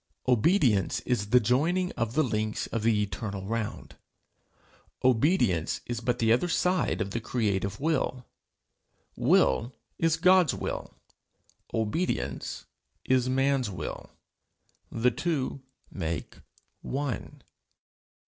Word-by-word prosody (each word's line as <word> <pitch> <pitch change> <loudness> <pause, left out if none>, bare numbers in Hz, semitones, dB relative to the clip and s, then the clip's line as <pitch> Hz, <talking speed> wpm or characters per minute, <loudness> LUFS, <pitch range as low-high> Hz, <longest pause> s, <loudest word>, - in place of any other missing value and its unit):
Obedience 125 - +3
is 105 -5 -1
the 125 - +6
joining 160 - +1
of 115 +1 -3
the 155 - +4
links 110 -4 -1
of 115 - -3
the 110 -1 +2
eternal 100 0 -5
round. 110 0 -4 1.1
Obedience 120 - +2
is 120 -2 -3
but 120 +1 0
the 115 -1 +3
other 125 +9 +1
side 180 -7 +1
of 100 -1 -2
the 115 - -2
creative 105 -4 -1
will. 135 -5 -1 0.9
Will 115 - +2 0.2
is 165 -1 +2
God's 180 -2 +5
will, - - -5 0.8
obedience 105 - -2 0.4
is 130 -1 +2
man's 135 -2 +1
will; 95 - -6 0.8
the 120 +2 +2
two 140 -5 -2 0.3
make 80 -5 -4 0.4
one. 135 -5 -4
120 Hz, 110 wpm, -28 LUFS, 105-140 Hz, 1.1 s, the